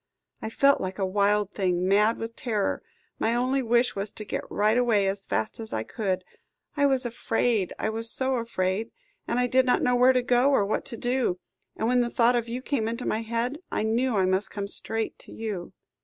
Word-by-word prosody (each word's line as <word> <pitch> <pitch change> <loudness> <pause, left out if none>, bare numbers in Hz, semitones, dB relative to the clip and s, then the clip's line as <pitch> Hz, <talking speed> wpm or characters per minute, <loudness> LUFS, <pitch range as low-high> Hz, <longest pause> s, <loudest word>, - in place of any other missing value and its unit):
I - - -4
felt 275 +4 +3
like 185 0 -4
a 195 - 0
wild 205 +1 +1
thing, 180 -2 0
mad 210 +4 +3
with 225 0 -6
terror, 215 -5 -1 0.4
my 230 +1 +1
only 255 +3 +1
wish 240 0 +2
was 200 +1 -2
to 215 - -7
get - - -3
right 215 +2 +2
away 235 -5 +3
as 195 0 -2
fast 110 - -2
as 220 -1 -4
I 110 - -1
could 190 - -2 0.5
I 285 -1 +3
was 265 -2 +3
afraid, 230 -4 0
I - - -1
was 225 +1 -3
so 260 +1 +1
afraid. 220 -2 -1 0.4
And 235 - -1
I 250 - +3
did 260 +1 +3
not 250 - +3
know 250 0 +3
where 250 +1 +5
to 250 -1 +1
go, 245 +2 +3
or 270 -8 +3
what 205 - -2
to 230 - -4
do; 245 -6 0 0.4
and, 220 - 0
when 250 +1 +3
the 240 - 0
thought 235 +1 +3
of 235 -1 -1
you 250 +2 -4
came 245 -7 -1
into 235 +2 -4
my 220 - 0
head, 235 +5 -2
I - - 0
knew 230 +2 +1
I 190 - +3
must 190 +1 0
come 200 -1 -4
straight 225 +2 -3
to - - -13
you." 210 -6 -5
225 Hz, 220 wpm, -26 LUFS, 200-245 Hz, 0.5 s, where